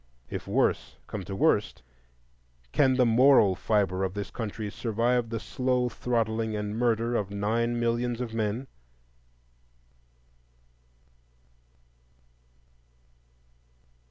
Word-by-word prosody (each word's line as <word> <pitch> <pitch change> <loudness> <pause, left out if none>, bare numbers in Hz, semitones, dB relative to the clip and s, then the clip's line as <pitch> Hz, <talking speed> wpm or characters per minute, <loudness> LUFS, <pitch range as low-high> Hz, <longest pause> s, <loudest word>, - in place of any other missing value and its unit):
If - - -5
worse 65 +2 0
come 105 -3 -6
to 100 - -5
worst, 100 -5 +1 0.9
can 130 -2 +3
the 125 -1 +4
moral 115 -3 +5
fibre 95 -2 0
of 95 0 -2
this 100 -5 -5
country 110 -2 -5
survive 115 +2 0
the 115 0 -3
slow 125 +1 0
throttling 115 -3 -1
and 105 0 -3
murder 115 0 +1
of 100 -4 -1
nine 115 +4 -1
millions 120 0 0
of 120 -3 -4
men? 110 +3 -2
115 Hz, 100 wpm, -27 LUFS, 105-120 Hz, 0.9 s, moral